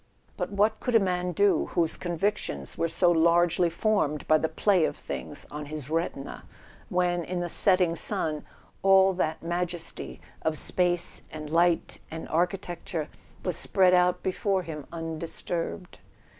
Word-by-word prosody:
But - - -3
what 205 +2 +1
could 245 - -1
a - - +8
man 180 -2 -1
do, 200 +4 +2
whose 170 -3 +1
convictions 175 - -2
were 165 - 0
so 175 +2 +3
largely 170 +1 +3
formed 165 -5 0
by 155 0 +5
the 160 - -1
play 195 -5 +2
of - - -3
things - - -6
on 150 0 -6
his 150 -1 -7
retina, 165 -4 -3 0.5
when, 175 -1 +1
in 180 +2 -3
the 175 - -2
setting 180 -1 +4
sun, 160 -6 -1 0.4
all 195 0 +5
that 160 -4 -2
majesty 175 0 -4 0.2
of 160 -1 -1
space 175 +1 +1
and 155 -1 -7
light 170 0 +2
and 160 0 -7
architec¬ 175 +1 -1
ture 155 -4 -4 0.4
was 180 -3 -1
spread 185 +1 +3
out 180 0 +3
before 190 0 0
him 150 -4 -7
undisturbed? 165 +2 -5
175 Hz, 150 wpm, -27 LUFS, 160-185 Hz, 0.5 s, a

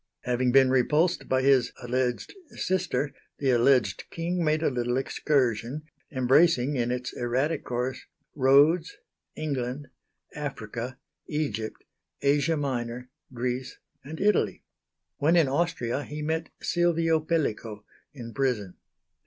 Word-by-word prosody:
Having 125 0 +1
been 135 0 +5
repulsed 150 +7 +2
by 130 0 +2
his 135 -2 +4
(alleged) 125 0 -1 0.2
sister, 160 -7 -1 0.2
the 135 -2 +1
alleged 120 -4 +3
king 170 +1 -2
made 155 0 +1
a - - +2
little 120 0 -1
excursion, 135 -1 0 0.3
embracing 135 +1 +3
in 120 -2 0
its 125 0 -3
erratic 130 +6 -1
course 125 +1 -3 0.3
Rhodes, 145 - +4 0.4
England, 140 -2 -3 0.4
Africa, 125 -3 -5 0.3
Egypt, 145 -8 -3 0.4
Asia 145 +3 +2
Minor, 125 -3 -3 0.2
Greece, 125 +1 -3 0.3
and 155 +4 -8
Italy. 200 - +1 0.5
When 160 +4 +3
in 165 -5 +5
Austria 140 -4 -1
he 150 +1 -6
met 160 +1 -2
Silvio 165 -2 +2
Pellico 115 -10 -2 0.3
in 120 -4 -9
prison. 120 -9 -1
135 Hz, 115 wpm, -27 LUFS, 125-155 Hz, 0.5 s, been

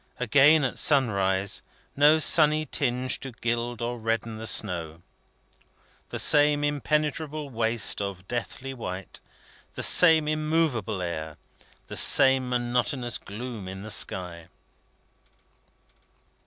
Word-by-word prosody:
Again 140 +5 +4
at 130 - -2
sunrise, 100 -8 +1 0.3
no 150 +2 +5
sunny 155 0 +4
tinge 130 -3 -2
to 135 -2 -8
gild 120 0 -4
or 120 0 -4
redden 115 0 -3
the 110 - -4
snow. 85 -6 0 1.1
The - - -6
same 145 -1 +3
interminable 150 0 -2
waste 115 -3 -1
of 95 -2 -6
deathly 125 +2 -6
white; 95 -6 -8 0.5
the - - -4
same 160 -3 +5
immovable 155 - -1
air; 80 -3 -6 0.5
the - - -8
same 130 -1 +4
monotonous 120 0 -1
gloom 110 -1 -8
in 95 +1 -8
the 110 - -7
sky. 90 -3 -1
120 Hz, 110 wpm, -25 LUFS, 100-145 Hz, 1.1 s, no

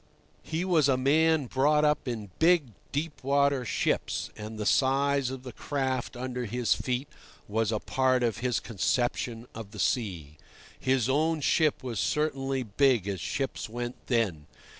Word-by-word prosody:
He 160 +3 -3
was 160 -6 +3
a 130 - +3
man 155 +3 +3
brought 150 +4 +3
up 150 -2 +1
in 110 -5 -4
big 165 -5 +4 0.2
deep 150 0 -3
water 140 -1 +2
ships, 115 - -1
and 110 +1 -7
the 105 - -3
size 135 +2 +2
of 130 -1 -7
the 125 - -7
craft 130 -3 -2
under 125 0 -3
his 120 +1 +1
feet 130 +2 -2 0.4
was 110 +1 0
a 110 - +1
part 130 +2 +1
of 115 -3 0
his 125 0 0
conception 120 +2 -1
of 110 -3 -8
the 105 0 -10
sea. 90 - -1 0.4
His 130 -3 +1
own 155 +4 +2
ship 155 0 +2
was 120 -5 -3
certainly 135 -2 0
big 120 -1 +2
as 95 -4 -3
ships 135 - -3
went 120 +2 -6
then. 100 - 0
130 Hz, 160 wpm, -28 LUFS, 115-140 Hz, 0.4 s, big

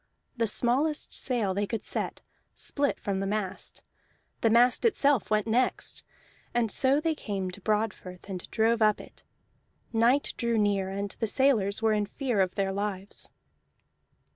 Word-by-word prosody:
The 230 -2 0
smallest 270 +8 +2
sail 230 -7 0
they 200 +1 -1
could 225 - -3
set - - -2 0.3
split 285 -1 -1
from 195 -1 -2
the 195 - -2
mast, 205 -2 -3 0.6
the 225 - +3
mast 240 +2 +4
itself 285 - +3
went 215 -1 +2
next, 240 +3 0 0.5
and 230 -3 +1
so 270 +5 +3
they 320 +1 0
came 195 -9 -4
to 200 +2 -11
Broadfirth 210 -4 -2
and 185 -3 -6
drove 225 +1 +2
up 215 -1 +4
it. - - -13 0.7
Night 235 +5 +3
drew 235 -1 0
near, 200 -2 +1
and 200 +1 -4
the 225 - 0
sailors 220 -4 +2
were 220 -1 +4
in 210 -1 0
fear 245 -3 -1
of 185 -1 0
their 195 -1 0
lives. 200 -1 -4
215 Hz, 155 wpm, -28 LUFS, 200-245 Hz, 0.7 s, mast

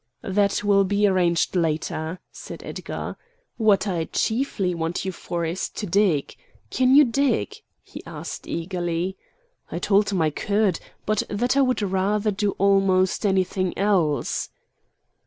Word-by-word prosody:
"That 200 +1 +1
will 200 -1 +4
be 205 +2 +1
arranged 180 -3 +2
later," 160 0 -1
said - - -9
Edgar. - - -6 0.4
"What 215 -3 +3
I 170 -4 -1
chiefly 220 - -1
want 165 +2 -3
you 190 - -1
for 170 -1 -4
is 170 +3 -3
to 210 - -5
dig. 185 -6 +1 0.4
Can 260 +1 +3
you 295 0 +8
dig?" 275 - 0 0.3
he - - -11
asked - - -7
eagerly. 175 +1 -2 0.6
I - - -3
told 205 +1 +2
him 195 -3 -1
I 155 - +1
could; 200 +2 0 0.3
but 215 -1 +1
that 240 +6 0
I 280 - +4
would 255 -5 +1
rather 200 +2 +1
do 200 0 -1
almost 195 0 +3
anything 185 -1 0
else. 180 -7 +1
195 Hz, 140 wpm, -24 LUFS, 175-210 Hz, 0.6 s, you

